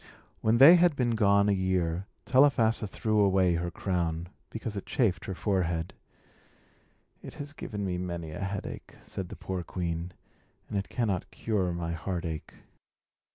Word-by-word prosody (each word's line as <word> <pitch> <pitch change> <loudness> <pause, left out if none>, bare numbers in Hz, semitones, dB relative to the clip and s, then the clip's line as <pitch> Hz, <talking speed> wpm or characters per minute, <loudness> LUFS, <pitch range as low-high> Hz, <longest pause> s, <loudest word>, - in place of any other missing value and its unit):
When 110 +2 +3
they 150 +8 +10
had 175 -3 +4
been 125 -3 +1
gone 100 -2 +4
a - - +4
year, 95 -1 0 0.2
Telephassa 115 -5 +4
threw 110 +2 0
away 95 -3 +4
her 85 +1 -1
crown, 85 -2 -2 0.2
because 110 -1 -5
it 100 - -5
chafed 110 -8 +1
her 95 - -4
forehead. 90 -4 -1 1.3
"It - - -10
has 145 +1 -7
given 105 -8 -5
me 90 -2 -2
many 85 -3 -4
a - - -7
headache," 100 0 -5
said 95 -2 -6
the - - -7
poor 95 -1 -4
queen, 85 0 -3 0.6
"and - - -6
it 100 0 -2
cannot 105 -7 -1
cure 100 -5 -1
my 85 -1 -3
heartache." 85 -2 -4
95 Hz, 155 wpm, -29 LUFS, 85-110 Hz, 1.3 s, they